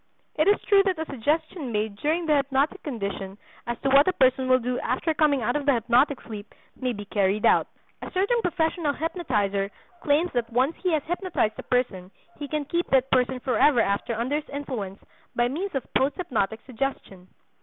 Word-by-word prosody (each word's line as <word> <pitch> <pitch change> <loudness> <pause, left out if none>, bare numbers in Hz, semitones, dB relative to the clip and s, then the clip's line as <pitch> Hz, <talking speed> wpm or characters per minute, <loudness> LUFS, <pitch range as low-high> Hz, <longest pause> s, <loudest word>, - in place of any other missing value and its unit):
It 310 - +2
is 410 - +5
true 400 -2 +5
that 375 -3 +1
a 320 - -3
suggestion 300 +2 -2
made 210 -1 -1
during 320 +7 0
the 305 -2 +3
hypnotic 280 +6 0
condition 200 -7 -5 0.3
as 240 -1 -2
to 270 - +2
what 280 +4 +6
a 370 - +3
person 260 -3 +2
will 255 - +6
do 250 0 -2
after 260 +7 -1
coming 295 -5 +2
out 245 +3 0
of 290 -1 -2
the 280 - +6
hypnotic 245 +5 +2
sleep 210 -2 -9 0.2
may 255 -1 -2
be 205 -3 -6
carried 200 0 +1
out. - - +4 0.3
A - - -6
certain 405 +6 +1
professional 325 -4 0
hypnotizer 210 - -1 0.3
claims 305 +4 +2
that 235 -2 -1
once 260 +7 +1
he 365 - -1
has 305 -3 +1
hypnotized 350 - -1
a - - -2
person 215 -8 -1 0.3
he 290 - -4
can 300 0 -2
keep 345 +4 -1
that 265 0 +2
person 255 0 +2
forever 255 +1 +3
after 210 +2 0
under 250 +6 -1
his 305 - -7
influence 245 -9 -5 0.4
by 240 0 +2
means 340 +7 -4
of 270 - -1
post 270 +2 +2
hypnotic 220 - -2
suggestion. 230 -8 -5
265 Hz, 195 wpm, -25 LUFS, 230-310 Hz, 0.4 s, what